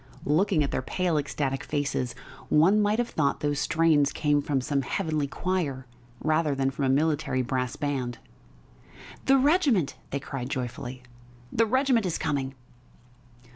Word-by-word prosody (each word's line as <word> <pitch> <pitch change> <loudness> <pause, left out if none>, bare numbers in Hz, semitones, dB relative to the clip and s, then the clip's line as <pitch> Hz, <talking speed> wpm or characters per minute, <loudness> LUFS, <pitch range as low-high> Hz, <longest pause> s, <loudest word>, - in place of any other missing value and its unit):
Looking 160 +2 +2
at 140 - -2
their - - -1
pale, 175 +5 -1
ecstatic 140 -1 -2
faces, 140 -4 -2 0.3
one 185 +8 +5
might 210 +1 +2
have 240 0 0
thought 145 -3 0
those 145 -1 0
strains 155 -3 +3
came 145 -1 +1
from 140 -1 0
some 140 +2 0
heavenly 155 0 -1
choir 150 -5 -2 0.4
rather 155 -2 +2
than 135 0 0
from 135 0 -2
a - - +2
military 140 -2 +1
brass 125 0 -2
band. 130 -5 -2 1.1
"The 270 0 +6
regiment!" 270 - +2
they 140 - -2
cried 135 -2 -5
joyfully. 125 -1 -5 0.5
"The 230 0 +3
regiment 255 -3 +2
is 170 - -1
coming!" 135 -2 -2
145 Hz, 145 wpm, -27 LUFS, 135-180 Hz, 1.1 s, The